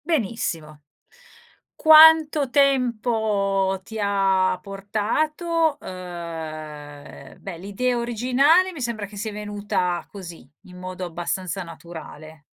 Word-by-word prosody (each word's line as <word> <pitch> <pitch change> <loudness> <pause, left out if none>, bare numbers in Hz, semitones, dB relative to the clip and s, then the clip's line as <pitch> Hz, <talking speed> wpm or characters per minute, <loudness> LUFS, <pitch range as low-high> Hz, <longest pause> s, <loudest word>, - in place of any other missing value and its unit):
Benissimo. 190 - -2 0.9
Quanto 315 -2 +7
tempo 220 -8 +1
ti 220 +3 -8
ha 195 -2 +2
portato? 300 - -1
Ehm, 155 -5 -8
beh, 185 -4 -7
l'idea 220 +7 -1
originale 255 - +3
mi 320 -6 -9
sembra 235 -4 -3
che 205 - -14
sia 215 +2 -4
venuta 205 -4 -2
così 170 -9 -10
in 180 -1 -14
modo 185 0 -6
abbastanza 175 +2 -4
naturale. 160 -2 -11
200 Hz, 95 wpm, -23 LUFS, 175-250 Hz, 0.9 s, Quanto